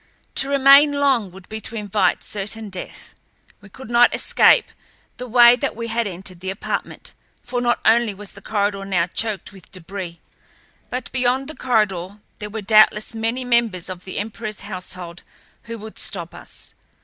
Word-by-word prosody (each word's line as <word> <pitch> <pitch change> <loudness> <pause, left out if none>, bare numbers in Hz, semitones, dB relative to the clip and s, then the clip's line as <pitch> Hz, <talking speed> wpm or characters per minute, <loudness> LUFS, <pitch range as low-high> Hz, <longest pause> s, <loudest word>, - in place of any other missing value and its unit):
To 270 - 0
remain 280 +1 +6
long 270 -8 +2
would 185 +1 -14
be 220 0 -7
to 230 - -7
invite 210 -1 0
certain 210 +1 -4
death. 185 - -8 0.5
We 200 - -15
could 250 +3 -11
not 240 0 +5
escape - - +4 0.5
the 250 - -6
way 240 0 +7
that 275 +2 -3
we 230 0 -5
had 230 0 0
entered 185 -1 -7
the 190 +1 -5
apartment, 190 - -5 0.3
for 245 0 -3
not 240 0 +1
only 230 0 +4
was 205 0 -8
the - - -13
corridor 200 -2 -1
now 185 -4 +1
choked 205 +1 -2
with 185 -4 -16
debris, 185 -1 -7 0.7
but 250 0 -5
beyond 260 +1 0
the 310 - -8
corridor 205 -6 0 0.2
there 210 - -6
were 215 0 -6
doubtless 215 +1 +4
many 225 +3 -2
members 230 -8 +1
of 180 -1 -7
the 185 - -7
emperorl's 215 0 -5
household 180 -3 -8 0.4
who 230 +1 -6
would 220 0 -10
stop 175 -4 -4
us. - - -11
215 Hz, 170 wpm, -21 LUFS, 190-240 Hz, 0.7 s, way